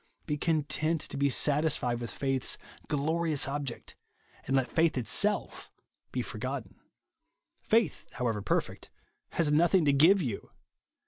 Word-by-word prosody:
Be 150 - -1
content 155 +1 +1
to - - -7
be 140 0 +2
satisfied 140 -3 +1
with 120 -2 -5
faith's 135 -2 -1 0.3
glorious 155 0 0
object, 140 -3 -5 0.5
and 135 - +1
let 130 -3 +1
faith 165 -3 +2
it 125 - -2
self 210 +1 0 0.4
be - - -2
forgotten. - - -6 0.8
Faith, 225 0 +1
however 115 -4 -1
perfect, 100 - -2 0.4
has 155 -3 +2
nothing 170 +3 +4
to 140 - +4
give 165 +8 +6
you. 125 - -4
145 Hz, 130 wpm, -30 LUFS, 135-165 Hz, 0.8 s, give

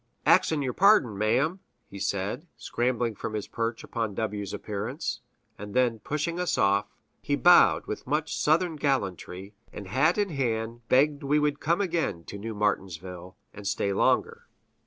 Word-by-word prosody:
"Ax'n 150 -3 +4
yer 130 -2 -2
pardon, 195 - +4
ma'm!" 125 - +1 0.3
he 100 - -10
said, 100 - -2
scrambling 120 -1 -1
from 110 +1 -5
his 105 - -4
perch 115 0 -3
upon 110 -4 -3
W 105 -1 -2
's 100 - -6
appearance; 110 +4 -4 0.4
and 105 -1 -8
then, 120 -3 +2
pushing 155 - -3
us 180 - 0
off, 100 +1 +2 0.3
he - - 0
bowed - - +6
with - - -6
much 150 +3 -1
Southern 160 +1 +1
gallantry, 100 - -2 0.2
and 100 - -8
hat 150 - +2
in 205 -1 +1
hand 120 -5 -2
begged 140 +2 +3
we 140 +2 +1
would 150 -1 +1
come 170 +5 +1
again 170 - -1
to 100 - -8
New 110 +1 -5
Martinsville, 95 -3 -3 0.2
and 100 -1 -7
stay 100 0 0
longer. - - +1
115 Hz, 160 wpm, -27 LUFS, 100-150 Hz, 0.4 s, bowed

